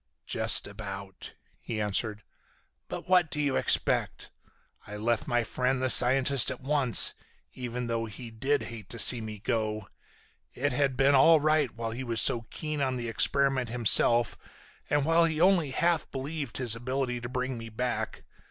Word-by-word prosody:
"Just - - +4
about," 100 -2 -9 0.2
he 110 -2 -6
answered. 105 +1 -2 0.6
"But - - -8
what 180 -3 +2
do 150 - -6
you 140 -3 -1
expect? - - -1 0.6
I 105 0 -8
left 115 +2 -2
my 120 0 0
friend 125 +3 -2
the 130 0 +2
scientist 130 +1 +4
at - - -6
once, 135 -4 +5 0.4
even 125 -1 -6
though 115 -1 -3
he 115 +2 -10
did 135 +6 -2
hate 115 -4 -10
to 120 - -5
see 120 0 +7
me 110 -1 -8
go. 110 0 -4 0.7
It 145 +1 -2
had 135 -1 -1
been 135 +1 +3
all 155 +4 +5
right 155 -2 +1
while 115 -1 -5
he 125 +3 -6
was 115 -2 -3
so 115 -1 +2
keen 155 -2 -6
on 130 -2 -1
the 120 -2 -5
experiment 135 +1 0
himself 120 0 +3 0.5
and 145 0 0
while 165 +1 +3
he 160 -2 -2
only 180 -4 +2
half 170 +5 -1
believed 140 -1 -6
his 120 -4 0
ability 125 +1 -4
to 120 - -7
bring 130 0 -4
me 115 0 -9
back. 125 +3 -5
125 Hz, 170 wpm, -27 LUFS, 115-140 Hz, 0.7 s, see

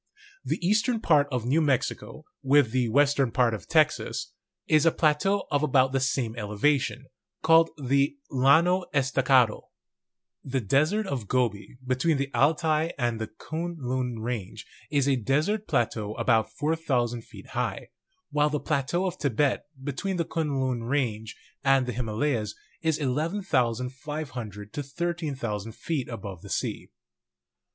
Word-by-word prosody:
The - - -1
eastern 220 +4 +2
part 150 -8 +3
of 125 -3 -2
New 145 +7 +2
Mexico, 140 +1 -1 0.2
with 140 -3 +4
the 125 -2 +1
western 140 +1 +3
part 120 -2 +2
of 110 - -6
Texas, 155 -2 +1 0.3
is 155 -1 +4
a 165 - +5
plateau 170 +7 +1
of 145 -1 +2
about 135 -3 +3
the 135 - +1
same 130 -3 -1
elevation, 125 +5 0 0.4
called 165 +1 +6
the 140 - +1
Llano 160 +8 +4
Estacado. 130 -4 +2 0.7
The 130 0 -1
Desert 155 - +2
of 130 - -4
Gobi, 120 -2 -1
between 130 +5 +1
the 140 0 -3
Altai 155 +5 +2
and 120 -2 -1
the 110 - -2
Kuen 165 +10 -5
Lun 125 -3 -2
range, 110 -2 -5 0.2
is 140 -2 +1
a 135 -2 +3
desert 155 - 0
plateau 110 -6 -1
about 115 -1 +2
4,000 135 -7 -1
feet - - -14
high, - - -3 0.4
while 150 0 +2
the 150 0 -1
plateau 140 +9 -1
of 185 - -3
Tibet, 140 0 0 0.2
between 180 +7 -3
the 170 - 0
Kuen 150 -5 -2
Lun 130 -2 -1
range 115 -4 -2 0.3
and 135 -1 +4
the 125 - -3
Himalayas, 115 -1 -1 0.3
is 160 -2 +1
11,500 130 - -2
to 145 - -3
13,000 140 - -3
feet 150 -1 -3
above 100 -7 -7
the - - -11
sea. - - -3
135 Hz, 140 wpm, -27 LUFS, 120-155 Hz, 0.7 s, called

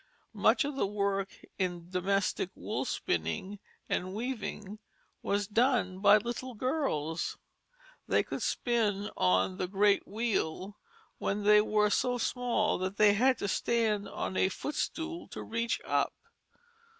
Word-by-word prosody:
Much - - +3
of 290 -1 -3
the 235 - +1
work 200 -1 -1 0.3
in 175 -2 -2
domestic 190 0 0
wool - - -3
spinning 85 - -2 0.3
and 185 +2 -2
weaving 215 -3 -4 0.4
was 205 +1 0
done 220 -4 +1
by 205 +1 +7
little 240 +3 -4
girls. 205 - -1 0.7
They - - +3
could - - -5
spin 215 -4 0
on 95 0 +2
"the - - -1
great 200 +2 +2
wheel" 200 -3 -2 0.4
when 205 +1 -1
they 210 0 +7
were 210 -1 +2
so 245 +3 +1
small 240 -4 0
that 190 +2 -3
they 210 -1 +6
had 255 +5 +3
to - - -2
stand 215 -1 0
on 185 - -3
a 190 - +3
foot 290 +9 -5
stool 335 +3 -3
to - - -7
reach 230 +1 -1
up. - - +1
205 Hz, 140 wpm, -31 LUFS, 190-235 Hz, 0.7 s, by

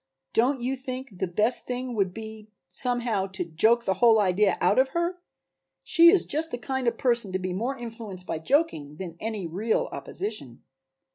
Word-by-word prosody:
Don't 250 +3 +2
you 255 +2 -1
think 255 -6 -7
the 190 - 0
best 215 +7 +1
thing 250 0 -3
would 195 -4 0
be 220 +1 -9 0.2
somehow 240 -6 +1
to 190 -2 -4
joke 220 +9 +3
the 190 - +2
whole 225 +4 +5
idea 195 0 +2
out - - +3
of 265 - +4
her? 345 +1 -1 0.6
She 335 0 +6
is 380 +1 +4
just 315 +3 0
the 245 - -4
kind 260 +2 -3
of 235 - +2
a - - -24
person 235 -6 +1
to - - +1
be 185 -1 -4
more 240 +8 -2
influenced 225 -6 -7
by 160 - -3
joking 160 - 0
than 175 -2 -7
any 215 -4 -4
real 200 +7 -1
opposition." 170 - -5
225 Hz, 190 wpm, -26 LUFS, 190-255 Hz, 0.6 s, She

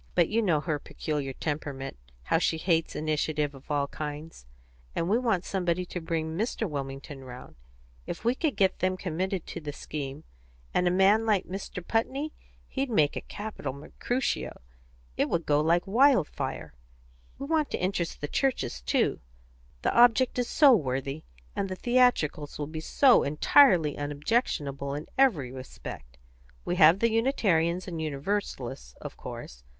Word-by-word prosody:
But 175 -2 +4
you 225 +2 +2
know 170 -8 +2
her 155 -2 -2
peculiar 145 -2 -4
temperament 140 -2 -4 0.3
how 160 - +2
she 165 - +1
hates 165 -1 0
initiative 150 -1 -1
of 135 +2 -15
all 145 -1 +1
kinds; 150 - -7 0.5
and 165 - 0
we 215 +5 +3
want 220 -8 0
somebody 180 -2 -1
to 180 0 -6
bring 160 -1 -2
Mr. 220 +2 -1
Wilmington 135 -2 -6
round. 125 -1 -11 0.5
If - - -6
we 240 - +4
could 295 +1 -1
get 190 -1 +2
them 185 0 0
committed 185 0 -2
to - - -6
the 150 -1 -5
scheme, 145 0 -6 0.5
and 180 - +2
a - - +5
man 195 +5 +4
like 205 -4 +2
Mr. 185 -1 -6
Putney 270 +7 -1 0.3
he'd 270 0 -2
make 155 -11 +2
a - - -3
capital 205 -10 -6
Mercutio 245 - -3 0.6
it - - +1
would 170 -1 0
go 145 0 +3
like 170 +3 +2
wildfire. 235 - +2 0.6
We 275 - -5
want 310 0 +1
to - - -2
interest 180 -2 -2
the 145 - -2
churches, 235 - -1
too. - - +1 0.6
The - - +1
object 245 +1 +5
is 245 - -1
so 280 -4 +7
worthy, 135 - -2 0.3
and 195 -1 -1
the 185 - -3
theatricals 240 - +2
will 150 - -3
be 155 +2 -6
so 260 - +5
entirely 155 - +4
unobjectionable 145 - -1
in 150 - -5
every 175 - +3
respect. 65 - -9 0.5
We 175 - -1
have 165 +2 +7
the 230 0 +3
Unitarians 185 - +1
and 165 -3 -4
Universalists, 140 - -3
of - - -8
course. - - -9
165 Hz, 155 wpm, -28 LUFS, 145-215 Hz, 0.6 s, so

